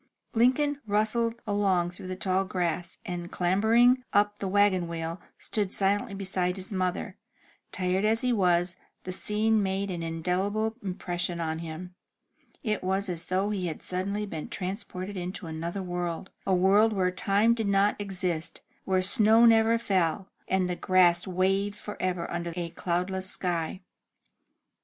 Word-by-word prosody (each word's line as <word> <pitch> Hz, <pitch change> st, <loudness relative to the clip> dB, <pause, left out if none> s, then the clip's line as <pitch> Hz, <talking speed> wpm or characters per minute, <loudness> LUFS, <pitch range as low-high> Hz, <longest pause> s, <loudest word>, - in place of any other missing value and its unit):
Lincoln 275 Hz, +5 st, +2 dB
rustled 220 Hz, +3 st, +1 dB
along 195 Hz, -4 st, +1 dB
through 180 Hz, -, -10 dB
the 185 Hz, -, -4 dB
tall 190 Hz, 0 st, 0 dB
grass, 175 Hz, -2 st, -2 dB
and, 175 Hz, -1 st, -5 dB
clambering 225 Hz, +8 st, +3 dB
up 205 Hz, 0 st, +2 dB
the 195 Hz, -, -2 dB
wagon 190 Hz, -2 st, +3 dB
wheel, 165 Hz, +1 st, -4 dB, 0.2 s
stood 205 Hz, -3 st, -2 dB
silently 200 Hz, 0 st, +1 dB
beside 185 Hz, -2 st, -1 dB
his 190 Hz, +1 st, -5 dB
mother. 185 Hz, -1 st, -2 dB, 0.5 s
Tired 185 Hz, +1 st, 0 dB
as 220 Hz, +1 st, +2 dB
he 250 Hz, -1 st, +1 dB
was, 180 Hz, -3 st, +2 dB, 0.3 s
the 185 Hz, -, -5 dB
scene 215 Hz, +3 st, +2 dB
made 195 Hz, 0 st, -1 dB
an 175 Hz, -2 st, -4 dB
indelible 185 Hz, +7 st, -1 dB
impression 175 Hz, -2 st, -3 dB
on 160 Hz, -1 st, -2 dB
him. 165 Hz, +2 st, -7 dB, 0.7 s
It 215 Hz, -5 st, -1 dB
was 190 Hz, +1 st, 0 dB
as 170 Hz, -2 st, -1 dB
though 190 Hz, +3 st, 0 dB
he 190 Hz, -4 st, -2 dB
had 160 Hz, -, -6 dB
suddenly 200 Hz, +3 st, -2 dB
been 160 Hz, -6 st, -6 dB
transported 190 Hz, 0 st, -5 dB
into 180 Hz, +1 st, -5 dB
another 165 Hz, +4 st, -4 dB
world, 175 Hz, 0 st, -4 dB, 0.2 s
a 190 Hz, -, +3 dB
world 200 Hz, +5 st, +4 dB
where 185 Hz, -2 st, +1 dB
time 200 Hz, +5 st, +3 dB
did 225 Hz, -3 st, -2 dB
not 200 Hz, +1 st, +3 dB
exist, 180 Hz, -4 st, -3 dB, 0.2 s
where 185 Hz, -1 st, +2 dB
snow 220 Hz, +3 st, +5 dB
never 225 Hz, 0 st, +5 dB
fell, 190 Hz, -4 st, 0 dB, 0.2 s
and 190 Hz, -1 st, +1 dB
the 180 Hz, -, -2 dB
grass 175 Hz, -1 st, +3 dB
waved 195 Hz, +2 st, +1 dB
forever 185 Hz, -5 st, -3 dB
under 170 Hz, 0 st, -3 dB
a 175 Hz, -2 st, -3 dB
cloudless 180 Hz, +2 st, -2 dB
sky. 175 Hz, -1 st, -2 dB
190 Hz, 150 wpm, -28 LUFS, 180-205 Hz, 0.7 s, snow